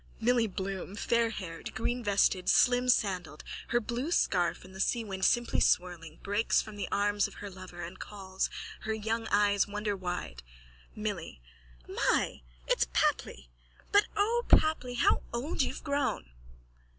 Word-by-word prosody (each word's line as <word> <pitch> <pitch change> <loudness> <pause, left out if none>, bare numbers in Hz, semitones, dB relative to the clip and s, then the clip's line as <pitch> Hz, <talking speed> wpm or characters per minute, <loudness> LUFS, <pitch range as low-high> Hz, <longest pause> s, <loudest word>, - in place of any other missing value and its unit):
_(Milly 235 0 +3
Bloom, 190 +1 -4
fairhaired, 220 -8 -1
greenvested, 205 -6 +1
slimsandalled, 205 - +3 0.2
her 240 - +2
blue 240 +6 -3
scarf 180 - +1
in 185 - -13
the 190 - -10
seawind 195 -2 -1
simply 240 +4 +3
swirling, 170 -3 +1
breaks 205 +3 +2
from 215 -1 -5
the 205 - -3
arms 205 0 +2
of - - -14
her 205 -1 -7
lover 185 -2 -9
and 175 +3 -8
calls, 190 -2 -3 0.3
her 220 0 -2
young 225 +1 -2
eyes 205 -1 +3
wonderwide.)_ 195 - -3 0.6
MILLY: 205 - -4 0.5
My! - - 0 0.3
It's - - +2
Papli! - - 0 0.4
But, 410 +1 +5
O 460 +4 +2
Papli, 285 -6 +3
how - - +3
old 250 +8 -2
you've - - -2
grown! 280 - -1
205 Hz, 130 wpm, -30 LUFS, 185-235 Hz, 0.6 s, But